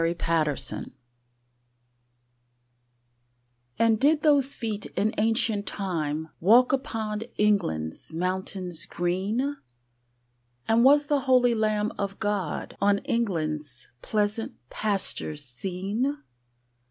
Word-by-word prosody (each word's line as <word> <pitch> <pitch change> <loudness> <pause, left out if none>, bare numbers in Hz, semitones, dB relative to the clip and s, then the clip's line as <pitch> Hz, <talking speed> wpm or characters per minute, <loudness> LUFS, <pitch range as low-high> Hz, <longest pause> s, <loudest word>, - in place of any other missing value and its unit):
Y - - +3
Z 170 - -1 0.3
Jerusalem 135 -5 -3 2.8
AND 225 -1 +3
did 300 +3 +3
those 285 -3 +4
feet 215 -5 -4
in 215 +2 +1
ancient 220 -2 +1
time 160 -5 -2
Walk 235 +9 +5
upon 220 -6 -2 0.2
England's 170 - 0
mountains 180 0 -2
green? 205 +11 -1 1.1
And 225 +1 +4
was 290 +2 +6
the 290 0 +2
holy 245 -2 +5
Lamb 215 -1 0
of 200 -1 -3
God 205 -6 -2
On 200 0 +4
England's 155 - -2
pleasant 210 +1 -1 0.2
pastures 195 -8 -1
seen? 195 - -2
205 Hz, 95 wpm, -26 LUFS, 175-230 Hz, 2.8 s, was